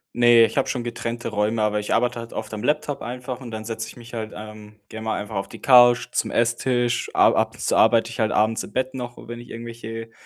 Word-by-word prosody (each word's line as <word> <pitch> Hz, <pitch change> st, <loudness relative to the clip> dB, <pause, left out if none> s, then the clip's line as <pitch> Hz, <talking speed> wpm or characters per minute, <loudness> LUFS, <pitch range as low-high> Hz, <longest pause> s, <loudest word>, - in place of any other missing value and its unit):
Ne, 120 Hz, -1 st, +6 dB
ich -, -, -2 dB
habe 135 Hz, -, +1 dB
schon 125 Hz, -3 st, -2 dB
getrennte 120 Hz, 0 st, -4 dB
Räume, 110 Hz, +1 st, 0 dB
aber 105 Hz, 0 st, +1 dB
ich 105 Hz, -, -1 dB
arbeite 120 Hz, +1 st, +1 dB
halt 115 Hz, 0 st, -8 dB
oft 110 Hz, 0 st, -6 dB
am 110 Hz, +2 st, -5 dB
Laptop 150 Hz, 0 st, 0 dB
einfach 125 Hz, +1 st, -6 dB
und 120 Hz, -3 st, -9 dB
dann 110 Hz, 0 st, -5 dB
setze 110 Hz, 0 st, -4 dB
ich -, -, -12 dB
mich 120 Hz, 0 st, -13 dB
halt, 110 Hz, -2 st, -5 dB
ähm, 105 Hz, 0 st, -11 dB
gerne 110 Hz, 0 st, -8 dB
mal 110 Hz, -, -1 dB
einfach 105 Hz, -, -7 dB
auf 95 Hz, -, -2 dB
die -, -, -12 dB
Couch, 120 Hz, -2 st, +6 dB
zum -, -, -1 dB
Esstisch. 120 Hz, +1 st, 0 dB
A -, -, +6 dB
ab -, -, +1 dB
und -, -, -14 dB
zu -, -, 0 dB
arbeite 115 Hz, 0 st, +4 dB
ich 120 Hz, -, -9 dB
halt 110 Hz, -1 st, +1 dB
abends 110 Hz, +1 st, +1 dB
im -, -, -11 dB
Bett 130 Hz, 0 st, -1 dB
noch, 120 Hz, -1 st, -6 dB
wenn 120 Hz, 0 st, -6 dB
ich 120 Hz, -, -12 dB
irgendwelche 115 Hz, -1 st, -7 dB
115 Hz, 250 wpm, -23 LUFS, 110-120 Hz, -, Ne